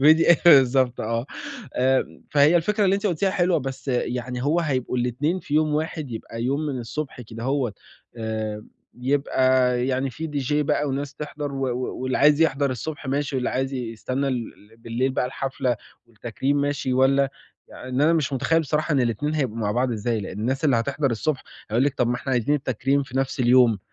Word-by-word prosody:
pdf 160 +3 +6
بالضبط 130 -5 +5
آه، 115 +3 -2 0.5
آمم، 130 +1 +1
فهي 145 +3 +5
الفكرة 205 +5 +1
اللي 190 0 +4
أنتِ 200 +1 -1
قُلتيها 190 +1 +1
حلوة 180 -2 +2
بس 135 0 -6
يعني 125 0 -2
هو 155 +4 +2
هيبقوا 130 -6 -1
الإتنين 140 +9 0
في 145 - -5
يوم 155 -1 +2
واحد، 155 -2 -3
يبقى 115 0 -6
يوم 140 +4 0
من 140 -3 -3
الصبح 130 +3 -5
كدهوّت 120 0 -3 0.4
آمم، 110 -1 -4 0.3
يبقى 130 -2 +2
يعني 130 0 0
في 160 +6 -5
dj 145 -2 -2
بقى 150 - +1
وناس 140 +1 -3
تحضَر 145 -1 -5
و 135 -1 -1
و 125 +1 -3
واللي 130 0 0
عايز 150 +1 +5
يحضَر 140 -3 +2
الصبح 145 +3 -5
ماشي، 140 +1 -1
واللي 125 - -1
عايز 135 +1 -1
يستنّى 130 +3 -2
ل 115 -3 -6
بالليل 115 +3 -1
بقى 125 - 0
الحفلة 130 -1 -2 0.3
والتكريم 120 +4 -2
ماشي 140 -2 -1
والّا 135 +1 +3 0.4
يعن 130 - -10
إن 130 +1 -1
أنا 155 +3 +4
مش 155 -4 0
متخيّل 165 +5 +2
بصراحة 155 +1 -1
إن 140 - +3
الإتنين 125 +6 0
هيبقوا 130 -7 -1
مع 105 -2 0
بعض 125 +2 +1
إزاي، 115 +1 -1
لإن 100 +1 -6
الناس 130 +6 -1
اللي 135 -5 +4
هتحضَر 135 +4 0
الصبح 130 +5 -1 0.3
هيقول 120 +5 +2
لِك 140 -1 0
طَب 120 - +2
ما 120 - +1
إحنا 135 +2 -4
عايزين 125 +4 +2
التكريم 135 0 0
في 130 -1 -8
نفس 135 0 -1
اليوم، 120 -3 +5
130 Hz, 190 wpm, -24 LUFS, 125-145 Hz, 0.5 s, pdf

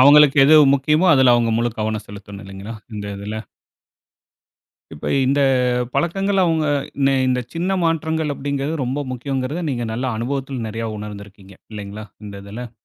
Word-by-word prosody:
அவங்களுக்கு 145 +1 +7
எது 155 +3 +6 0.2
முக்கியமோ, 150 +6 +2
அதில 130 -2 +5
அவங்க 115 -1 +2
முழு 120 0 0
கவனம் 110 0 -2
செலுத்தணும் 100 0 -10
இல்லைங்களா? 100 +3 -8 0.2
இந்த 105 0 -5
இதில. 105 +2 -6 1.6
இப்ப 75 - -5 0.2
இந்த 140 +2 +2 0.5
பழக்கங்கள் 195 +3 +1
அவுங்க 160 -2 +1 0.4
இந் 135 - +4 0.2
இந்த 125 0 +1
சின்ன 180 +3 -1
மாற்றங்கள் 160 -2 0
அப்படின்கிறது 140 +2 -3
ரொம்ப 135 +4 -2
முக்கியம்கிறத 135 +5 -3
நீங்க 120 -2 -2
நல்ல 125 +4 -3
அனுபவத்தில் 130 0 -3
நிறைய 115 +1 -4
உணர்ந்து 105 -1 -7
இருக்கீங்க 95 -1 -16 0.2
இல்லைங்களா? 105 0 -7 0.2
இந்த 100 -1 -8
இதில. 115 +3 -7
130 Hz, 145 wpm, -20 LUFS, 105-145 Hz, 1.6 s, அவங்களுக்கு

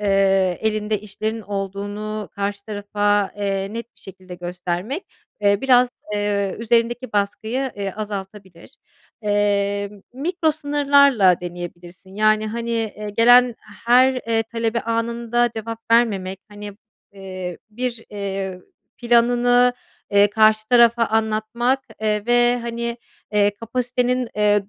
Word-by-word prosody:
eee, 195 -2 +2
elinde 215 -1 -1
işlerin 215 +2 -4
olduğunu 205 +2 -5
karşı 200 -1 -4
tarafa, 205 -1 0
eee, 195 0 -2
net 230 +1 -7
bir - - -20
şekilde 185 -1 -11
göstermek, 180 - -4 0.3
eee, 200 0 +3
biraz, 250 -2 +5 0.3
eee, 205 -1 -1
üzerindeki 235 +1 0
baskıyı, 220 +6 -1
eee, 200 -2 -4
azaltabilir. 195 -2 -8 0.5
Eee, 205 -1 0 0.2
mikro 320 +4 0
sınırlarla 280 - +3
deneyebilirsin. 175 +1 -9
Yani, 215 +1 +2
hani, 235 +1 -4
eee, 215 -2 -3
gelen 245 +1 +6 0.3
her, 255 +2 +6
eee, 230 -3 -1
talebe 230 0 -2
anında 235 +1 0
cevap 225 +1 -5
vermemek, 195 -5 +2
hani, 205 0 -9 0.4
eee, 185 -3 -7
bir, 235 0 -4
eee, 195 -2 -4 0.4
planını, 245 +1 +3 0.4
eee, 205 0 +5
karşı 215 0 +3
tarafa 235 -1 +5
anlatmak, 220 +4 0 0.2
eee, 210 -1 -1
ve, 240 0 +3
hani, 235 0 -4 0.4
eee, 205 -1 +4
kapasitenin, 250 +1 -1
eee, 205 -1 +2
215 Hz, 115 wpm, -21 LUFS, 200-235 Hz, 0.5 s, gelen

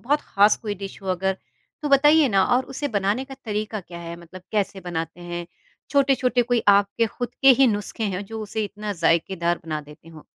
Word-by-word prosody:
बहुत 290 +5 +1
ख़ास 205 +1 +3
कोई 210 -2 -4
डिश 195 +1 -8
हो 190 - -6
अगर? 190 +1 0 0.5
तो 295 - -1
बताइए 295 +1 +5
ना 195 -2 +3
और 260 - 0
उसे 290 +2 -2
बनाने 205 +3 0
का 270 0 -10
तरीक़ा 215 -1 -3
क्या 175 -1 -11
है? 170 0 -7
मतलब 175 +2 -12
कैसे 200 -2 -1
बनाते 165 -1 -5
हैं? 175 0 -6 0.4
छोटे-छोटे 265 -3 +3
कोई 240 -1 0
आपके 200 +3 +4
ख़ुद 245 +2 -6
के 270 - +7
ही 270 - +7
नुस्खे 210 0 -2
हैं, 200 -1 -2
जो 220 +2 -7
उसे 215 +1 -3
इतना 210 +1 -5
ज़ायकेदार 170 0 +1
बना 155 -2 -3
देते 150 +2 -15
हो। 160 -2 -13
205 Hz, 200 wpm, -23 LUFS, 175-240 Hz, 0.5 s, के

